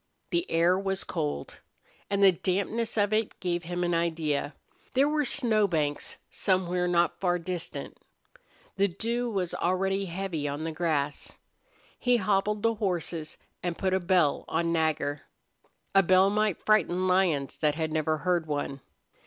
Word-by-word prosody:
The 345 +1 0
air 175 +3 +3
was 195 0 -1
cold. 70 -1 -4 0.5
And 200 0 +1
the 195 - +8
dampness 200 +6 -1
of 205 0 +2
it 220 0 0
gave 175 -1 -2
him 175 +1 -2
an 175 0 0
idea 160 -4 -1 0.4
there 275 +2 +4
were 300 0 +1
snow 230 -6 +2
banks 150 -5 -2
somewhere 180 -2 0
not 175 -1 +2
far 180 -2 +1
distant. 175 -1 -5 0.8
The 200 +1 +4
dew 235 +6 -2
was 190 -5 -1
already 195 +2 0
heavy 175 -4 -3
on 145 +2 -3
the 165 - -2
grass. 155 -3 -2 0.6
He 245 -1 +3
hobbled 205 0 0
the 230 0 +3
horses 175 -6 -3 0.2
and 175 -2 -3
put 190 -1 0
a 190 - +3
bell 175 -5 +2
on 165 +1 0
Nagger. 150 -3 0 0.7
A 195 - +7
bell 185 +1 +4
might 210 -3 0
frighten 185 -3 +3
lions 180 -7 +1
that 150 -2 +1
had 160 -1 -2
never 155 0 +1
heard 175 -1 0
one. 145 -2 -3
180 Hz, 155 wpm, -28 LUFS, 160-200 Hz, 0.8 s, the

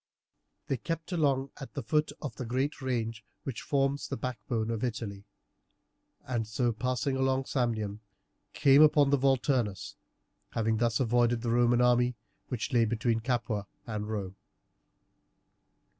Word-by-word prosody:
They 135 - -1
kept 165 +7 -4
along 140 -5 +1
at 135 - -9
the 140 - -3
foot 150 +6 +1
of 135 -6 -4
the 130 - -5
great 130 +5 -1
range 115 -4 -2 0.2
which 130 -6 -5
forms 140 0 0
the 140 - -4
backbone 115 -2 -2
of 115 0 -3
Italy, 110 -5 -4 1.0
and 120 -4 -2
so 120 +2 +1
passing 125 +3 -1
along 130 0 +1
Samnium, 110 -6 -1 0.5
came 135 0 +5
down - - +11
upon 150 -2 +3
the 140 - +4
Volturnus, 130 -6 +1 0.6
having 110 -1 +1
thus 115 0 +1
avoided 120 -1 +2
the 115 - 0
Roman 120 0 +4
army, 125 0 +3 0.3
which 125 +1 -3
lay 115 -2 +5
between 115 +1 0
Capua 115 -4 -1 0.2
and 105 -2 -4
Rome. 100 -3 -4
120 Hz, 145 wpm, -30 LUFS, 115-135 Hz, 1.0 s, down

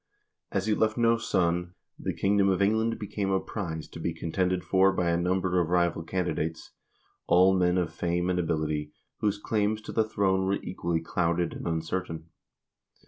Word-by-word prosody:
As 100 -1 -1
he 110 - +2
left 110 +1 +1
no 115 -1 +4
son, 90 -3 0 0.2
the - - -2
kingdom 100 0 +3
of 95 - +1
England 110 +3 +2
became 100 -1 -3
a 95 0 +2
prize 85 -7 -5
to - - -10
be 85 0 -2
contended 90 +2 -1
for 95 +2 +4
by 90 -3 0
a - - +2
number 90 +1 +1
of 85 - -2
rival 85 -1 +2
candidates, 80 -2 -3 0.6
all 95 +2 +5
men 90 -1 +2
of 90 -2 -1
fame 85 +1 -1
and 90 -1 +1
ability, 75 -3 -1 0.3
whose 105 -1 +1
claims 105 0 0
to - - -7
the 110 - +2
throne 95 -3 +1
were 100 - +2
equally 85 -2 -2
clouded 85 0 0
and - - -6
uncertain. 80 0 -3
90 Hz, 175 wpm, -28 LUFS, 85-100 Hz, 0.6 s, all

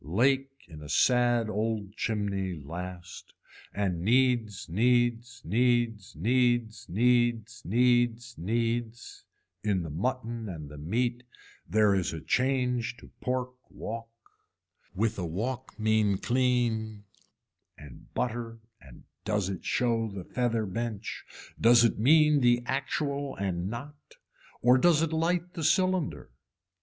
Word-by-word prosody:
Lake 135 - 0
in 80 -3 -11
a 75 - -10
sad 120 - +3
old 110 -1 -2
chimney 100 -5 -2
last 85 +4 -8 0.4
and 95 -4 -2
needs 120 -2 +1
needs 120 +4 +1
needs 115 -1 +1
needs 120 +4 +1
needs 120 +2 +1
needs 120 +2 +2
needs, 115 +4 -3 0.4
in 100 -4 0
the 80 - -6
mutton 115 - -3
and 75 -5 -7
the 75 - -10
meat 120 +9 -1 0.5
there 105 -1 +4
is 95 -3 0
a 80 - -5
change 125 - 0
to - - -15
pork 125 0 -2 0.2
walk, 115 +1 -6 0.9
with 105 +1 0
a 90 - -2
walk 120 +10 -4
mean 110 -2 +2
clean 120 -3 0 0.7
and 75 -4 -14
butter 115 -1 -2 0.2
and 65 -3 -15 0.2
does 105 -3 -1
it 95 -3 -5
show 115 -2 0
the 100 -2 -7
feather 115 0 -1
bench 110 +1 -4 0.4
does 120 +1 +7
it 115 - +2
mean 150 +4 +5
the 120 0 +3
actual 140 +1 -2
and 95 -2 -2
not 140 +6 -9 0.5
or 125 +2 +6
does 165 +1 +4
it 165 -1 -1
light 175 +2 0
the 165 - -5
cylinder. 175 - +1
115 Hz, 125 wpm, -28 LUFS, 100-125 Hz, 0.9 s, does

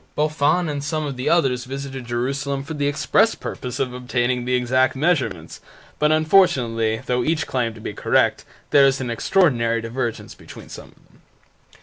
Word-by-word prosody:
Boffin 155 +3 +1
and 145 -2 -3
some 155 +1 -2
of 140 -2 -4
the 125 +1 -2
others 130 -8 +2
visited 135 -1 -6
Jerusalem 135 +3 -2
for 160 - -7
the 145 -2 -1
express 145 +10 +2
purpose 125 +1 -6
of 130 -2 -1
obtaining 125 0 -1
the 125 0 +1
exact 130 +1 +1
measurements, 130 - -1 0.4
but 150 0 +3
unfortunately, 130 - +2
though 125 -1 0
each 155 0 0
claimed 115 -4 -2
to 110 - -12
be 105 - -5
correct, - - +1 0.3
there 140 -1 +6
is 135 0 +1
an 125 -3 -3
extraordinary 115 - +2
divergence 115 0 -4
between - - -13
some - - -10
of - - -23
them. - - -27
130 Hz, 170 wpm, -21 LUFS, 120-150 Hz, 0.4 s, there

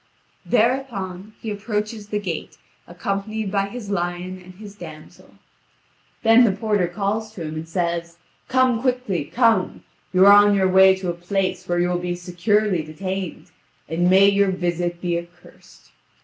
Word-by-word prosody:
Thereupon, 215 -6 -1
he 220 - -5
approaches 210 0 -4
the 210 - -2
gate, 180 -6 -5 0.3
accompanied 200 +4 -3
by 200 -1 0
his 205 -1 -7
lion 180 0 -3
and 180 0 -14
his 205 +1 -11
damsel. 160 -6 -13 0.9
Then 225 +2 +6
the 225 - +4
porter 205 -2 0
calls 205 +4 -2
to 180 - -7
him, 155 -1 -5
and 160 +1 -6
says: 170 -1 -2 0.3
"Come 255 -3 +2
quickly, 250 - -1
come. 225 - +1 0.3
You 185 +1 +5
are 200 - +9
on 205 0 +6
your 190 -1 +3
way 190 0 +6
to 185 -2 -3
a - - -5
place 185 +1 -2
where 175 - 0
you 175 0 +2
will 175 0 0
be 175 0 -3
securely 180 +2 0
detained, 185 +4 -6 0.4
and 175 +3 +1
may 190 +2 +6
your 200 0 +3
visit 175 -1 -2
be 175 -1 0
accursed." 175 +1 -17
190 Hz, 160 wpm, -22 LUFS, 175-210 Hz, 0.9 s, are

